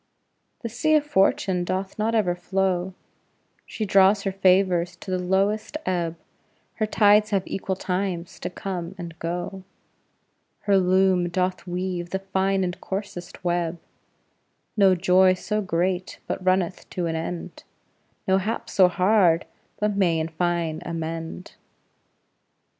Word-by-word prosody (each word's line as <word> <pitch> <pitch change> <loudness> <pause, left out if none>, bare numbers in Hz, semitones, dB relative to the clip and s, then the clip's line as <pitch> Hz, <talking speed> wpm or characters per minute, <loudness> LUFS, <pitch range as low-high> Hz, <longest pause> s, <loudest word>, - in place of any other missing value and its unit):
The 230 - -3
sea 310 +8 +2
of 300 -1 +3
Fortune 190 -7 +2
doth 190 +3 -3
not 225 +2 +1
ever 195 -5 +2
flow; 185 0 -1 0.7
She 215 - -3
draws 195 +1 +4
her 195 - -1
favors 185 -2 +2
to 185 - -8
the 185 - 0
lowest 195 +8 0
ebb; 170 -3 -1 0.6
Her 215 - 0
tides 210 0 +4
have 195 -3 0
equal 190 0 -3
times 180 -2 -3
to - - -4
come 180 -1 -5
and 170 -2 -7
go; 175 +3 -4 1.0
Her 200 -1 +3
loom 185 -1 +3
doth 185 +1 -2
weave 180 -1 -3
the 190 - -1
fine 195 0 0
and 180 -1 -4
coarsest 190 -3 -6
web; 175 -1 0 1.0
No 195 -3 +5
joy 185 +1 +4
so 210 +3 -2
great 180 0 -1
but - - -4
runneth 185 -1 0
to 180 - -3
an 165 -1 -1
end, 165 +1 -5 0.6
No 190 0 +4
hap 215 +4 -3
so 190 -3 +6
hard 185 -2 +3 0.3
but 210 -1 0
may 175 -5 +2
in 160 +1 -2
fine 165 -1 -1
amend. 165 +1 -5
185 Hz, 135 wpm, -24 LUFS, 175-195 Hz, 1.0 s, so